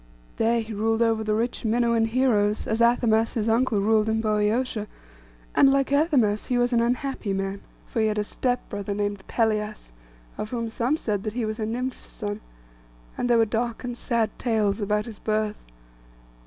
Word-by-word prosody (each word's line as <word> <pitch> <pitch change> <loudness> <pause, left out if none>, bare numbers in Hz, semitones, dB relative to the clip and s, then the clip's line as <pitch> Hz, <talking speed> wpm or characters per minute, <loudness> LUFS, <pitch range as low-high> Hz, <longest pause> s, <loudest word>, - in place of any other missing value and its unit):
There 230 +1 +2
he 220 0 -7
ruled 225 +2 +1
over 225 -1 +1
the 215 0 0
rich 235 +3 -2
Minuan 235 0 +2
heroes, 225 -4 +2
as 220 +1 0
Athamas 230 -1 +3
his 225 -2 0
uncle 230 -1 +2
ruled 215 +1 +2
in 220 0 +1
Boeotia; 215 +1 0 0.7
and, 275 - +6
like 275 0 +1
Athamas, 275 -9 +2
he 250 - +1
was 245 0 +2
an 235 - +4
unhappy 245 -3 -1
man. 195 0 -3 0.2
For 225 - -2
he 220 - +3
had 215 0 -1
a 210 - +1
step 245 +4 -2
brother 205 0 -4
named 205 -1 -2
Pelias, 215 - -1 0.5
of 215 - -3
whom 230 -1 -3
some 245 +6 0
said 210 -9 -2
that 215 +1 -4
he 240 -1 -1
was 215 +1 -4
a 215 - -1
nymph's 250 +3 -4
son, 205 -1 -5 0.7
and 245 - -2
there 240 - +5
were 225 - +5
dark 230 +2 -2
and 245 -1 -4
sad 230 -3 0
tales 220 -3 +1
about 210 +1 0
his 225 -3 -9
birth. 215 -1 -1
225 Hz, 185 wpm, -25 LUFS, 210-240 Hz, 0.7 s, and